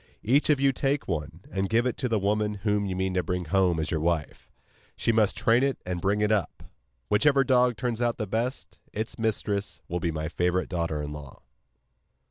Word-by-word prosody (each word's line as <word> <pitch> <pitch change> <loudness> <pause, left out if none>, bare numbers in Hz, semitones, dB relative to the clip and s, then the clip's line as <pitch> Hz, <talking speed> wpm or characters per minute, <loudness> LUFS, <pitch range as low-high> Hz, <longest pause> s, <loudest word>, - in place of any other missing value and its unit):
Each 135 +8 +3
of 150 -3 +4
you 135 0 +4
take 135 +2 -1
one, 80 -1 -4
and 95 0 -1
give 115 +2 +2
it 125 - 0
to 125 - -2
the 115 - +2
woman 105 +1 0
whom 105 -1 +1
you 95 - -3
mean 95 0 -1
to 90 - +2
bring 90 +1 -3
home 90 -1 +2
as 80 - -2
your 80 - 0
wife. 80 -1 -2 0.5
She - - +1
must 110 -3 +2
train 115 +2 +3
it 135 0 +1
and 90 -1 -3
bring 100 +3 +1
it 105 0 +2
up. 105 -6 -1 0.4
Whichever 140 +6 +4
dog 125 -2 +3
turns 120 -2 -2
out 120 -1 +1
the 110 - -2
best, 115 +6 -3
its 110 +2 -4
mistress 105 -2 -1
will 90 - -2
be 85 - -1
my 80 -1 -3
favourite 90 +2 0
daughter 85 -4 -2
in 75 - -5
law. 75 -3 -10
105 Hz, 210 wpm, -27 LUFS, 90-120 Hz, 0.5 s, of